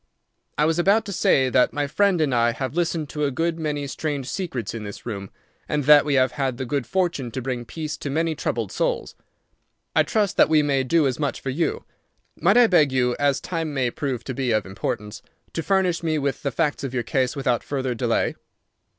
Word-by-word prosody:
I 150 - +3
was 165 +2 +1
about 200 +5 +3
to 200 - -5
say 130 -6 +3
that 125 - +3
my 145 0 0
friend 185 +5 +2
and 145 -4 +1
I 120 -1 +3
have 130 +2 -4
listened 165 -2 -1
to 150 -1 -3
a - - +1
good 165 +5 -1
many 150 -2 -2
strange 140 -1 -3
secrets 135 - -4
in 115 -2 -5
this 100 -1 -8
room, 100 -5 -5 0.4
and 150 -1 0
that 145 +1 +7
we 145 -2 +1
have 130 -1 +3
had 135 -4 -2
the 130 - -3
good 135 -1 -2
fortune 175 -8 -1
to 125 - -5
bring 125 -1 -4
peace 155 +3 -5
to 145 - -5
many 160 +3 0
troubled 155 - -3
souls. - - -1 0.8
I - - +6
trust 210 -3 0
that - - +6
we 155 -1 +4
may 140 -2 +1
do 155 +4 +2
as 130 0 -1
much 145 -3 -1
for 135 - -3
you. 165 +5 -1 0.5
Might 195 +8 +3
I 245 - +8
beg 155 -9 +4
you, 125 -2 +1
as 140 -1 +2
time 165 -4 -4
may 125 -3 +1
prove 130 -4 -3
to 130 - -5
be 130 0 -2
of 110 -3 +1
importance, 100 +2 -4 0.3
to 165 - -2
furnish 185 -1 +1
me 160 -2 0
with 140 -2 -2
the 140 - -1
facts 150 -1 -1
of 135 -2 -4
your 120 - 0
case 130 +3 0
without 125 -4 0
further 130 -3 -2
delay?" 115 - 0
145 Hz, 220 wpm, -23 LUFS, 130-165 Hz, 0.8 s, I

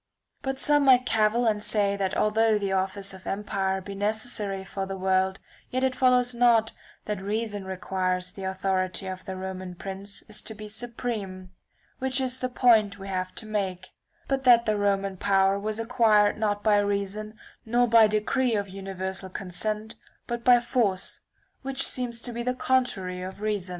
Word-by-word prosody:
But 270 0 -3
some 290 +1 +3
might 255 -2 +6
cavil 225 +1 +2
and 210 -2 +1
say 205 -2 +2
that 195 -2 -1
although 220 +1 +3
the 200 -2 -2
office 195 +1 -1
of 190 0 -12
empire 195 -1 -1
be 200 +2 -7
necessary 205 -1 -2
for 195 0 -5
the 195 0 -5
world 190 0 +1 0.3
yet 255 +1 -1
it 260 -1 +1
follows 250 -1 +3
not 235 -2 +4 0.3
that 210 -2 -3
reason 205 0 -3
requires 185 -1 -2
the 195 - -10
authority 190 -1 -1
of 185 0 -6
the 190 -1 -5
roman 185 -1 -6
prince 195 +2 -5
is 215 0 -5
to 220 - -6
be 215 0 -8
supreme 210 -5 -5 0.5
(which 265 0 0
is 260 -1 -2
the 255 - -2
point 220 -5 +4
we 195 0 -8
have 185 -1 -3
to 220 - -7
make); 190 -4 -3 0.4
but 270 -1 -1
that 240 -2 +6
the 215 - +1
Roman 195 -1 0
power 195 +1 +2
was 215 +1 -3
acquired 225 -3 +3
not 205 -1 -1
by 210 -1 +4
reason 205 +1 -2 0.3
nor 240 +2 +2
by 230 -1 +7
decree 220 +3 +1
of 200 -1 -1
universal 190 0 -5
consent, 210 +4 -3 0.3
but 240 0 -4
by 250 0 +7
(^903 240 - -3
force, 215 -7 0 0.4
which 270 0 +1
seems 245 -2 -1
to 240 - -3
be 235 - -3
the 250 +1 -1
contrary 195 -9 0
of 185 +2 -7
reason. 205 -3 -2
205 Hz, 175 wpm, -26 LUFS, 190-235 Hz, 0.5 s, by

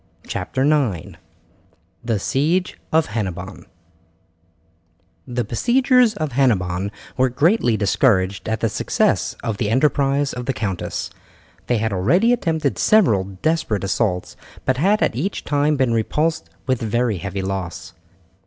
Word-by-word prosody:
CHAPTER 130 - -2
IX: 135 - 0 0.9
THE 115 -3 0
SIEGE 155 - 0
OF 160 -1 +3
HENNEBON 95 -4 -5 1.6
The 120 0 -2
besiegers 245 - +3
of 155 -6 -3
Hennebon 100 -8 +1 0.3
were 130 0 +3
greatly 135 - +2
discouraged 100 -2 +1
at 110 -1 -2
the - - +1
success - - 0
of 110 -3 -2
the 105 -2 -1
enterprise 140 +2 +2
of 125 0 -6
the 135 - +1
countess. 100 -6 -3 0.6
They 120 - +2
had 110 -1 -1
already 170 - +3
attempted 160 - -1
several 115 - +4 0.2
desperate 155 - 0
assaults, 95 -2 -1 0.3
but 130 -1 +1
had 200 +9 +3
each 180 +11 -2
time 145 +1 +1
been 130 -3 +2
repulsed 115 - 0 0.2
with 130 -2 0
very 115 -1 0
heavy 100 0 -4
loss. 90 -4 -5
125 Hz, 125 wpm, -21 LUFS, 100-150 Hz, 1.6 s, several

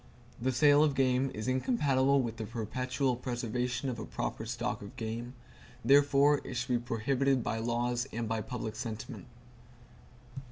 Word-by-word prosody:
The 130 +2 +1
sale 145 +3 +5
of 145 -3 +2
game 130 0 +2
is 110 +3 -4
incompatible 135 - +2
with 115 -1 -4
the 110 - -4
perpetual 125 +4 -1
preservation 125 +1 -2
of 120 -3 -3
a - - -5
proper 110 - -4
stock 120 +1 -3
of 100 +5 -10
game; 115 +2 -4 0.5
therefore 140 +2 +5
it 130 - -6
should 120 - -2
be 120 - +3
prohibited 125 +3 +1
by 110 - -2
laws 120 +2 -1
and 115 0 -3
by 110 0 -1
public 110 -2 -5
sentiment. 115 -2 -6
125 Hz, 155 wpm, -31 LUFS, 115-135 Hz, 0.5 s, sale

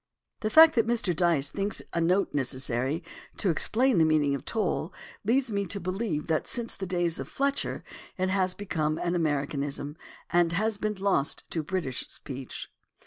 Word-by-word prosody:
The 215 - -1
fact 320 +6 +8
that 230 -2 +2
Mr. 225 -7 +1
Dyce 165 -5 +2
thinks 200 +1 -1
a 170 - +1
note 180 +4 +2
necessary 130 +2 -1 0.3
to 190 - +1
explain 235 +6 +3
the - - +6
meaning 155 -3 +3
of 140 - -4
"tole" 200 -5 -1 0.3
leads 245 +3 +2
me 200 -1 -1
to 200 - -2
believe 185 -4 -2
that 160 -1 0
since 235 -1 -1
the 190 - -5
days 175 -2 0
of - - -5
Fletcher 280 0 -1 0.3
it 185 0 0
has 185 -1 +1
become 155 -6 -1
an 175 +1 -1
American 145 -4 0
ism, 145 +1 -3 0.4
and 170 -1 +3
has 215 +3 0
been 215 0 -1
lost 190 -7 +1
to 165 - -1
British 155 -5 -3
speech. 135 -2 -7
175 Hz, 175 wpm, -28 LUFS, 150-205 Hz, 0.4 s, fact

